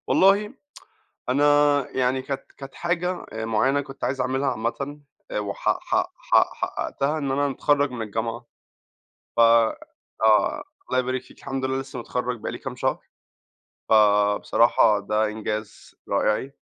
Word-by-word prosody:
والله 200 +4 +4 0.8
أنا 135 +3 +2 0.5
يعني 130 0 0
كانت 135 0 -4
كانت 135 -1 -10
حاجة 175 +1 -2
آآ 110 0 -4
معينة 130 +6 +2
كنت 135 -1 -8
عايز 130 0 -1
أعملها 130 +2 0
عامةً 135 +5 -4 0.4
وحق 100 -1 -1
حق - - -1
حق - - +2
حققتها 145 +3 -2
إن 140 -3 -2
أنا 140 +1 +1
أتخرّج 145 +1 +1
من 125 -2 -5
الجامعة 115 +3 -4 0.9
ف - - +1
آه، 115 -1 +2 0.3
الله 130 - +2
يبارك 130 0 -1
فيكِ، 130 - -19
الحمد 135 0 -4
لله 130 0 -1
لسه 135 - -8
متخرّج 125 -1 -3
بقى - - -4
لي - - -6
كام - - -7
شهر، - - -1 0.9
فبصراحة 105 +1 +4
ده 105 +2 0
إنجاز 105 0 -5
رائعي. 130 +6 0
130 Hz, 135 wpm, -24 LUFS, 110-140 Hz, 0.9 s, والله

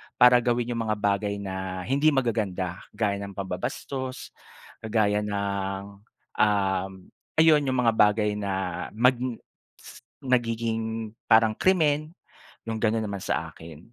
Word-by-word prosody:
para 125 0 +7
gawin 120 0 0
yung 115 - -1
mga 110 - +1
bagay 100 0 0
na 95 -1 -4
hindi 140 +7 +1
magaganda. 100 -8 -1 0.2
Gaya 100 -2 0
ng 100 -1 -7
pambabastos, 130 +8 -5 0.5
kagaya 105 -2 +1
ng, 100 -1 -3 0.4
um, 95 -2 +2 0.5
ayun 155 -3 +5
yung 130 -1 0
mga 115 - +5
bagay 105 0 +3
na 95 -3 -3
mag 125 +3 +5 0.7
si - - -13 0.2
nagiging 115 -3 -1 0.2
parang 110 -1 +5
krimen, 155 -4 +2 0.5
yung 115 -1 -3
gano'n 110 0 +1
naman 100 -2 -5
sa - - -2
akin. 80 -2 -11
110 Hz, 125 wpm, -26 LUFS, 100-120 Hz, 0.7 s, para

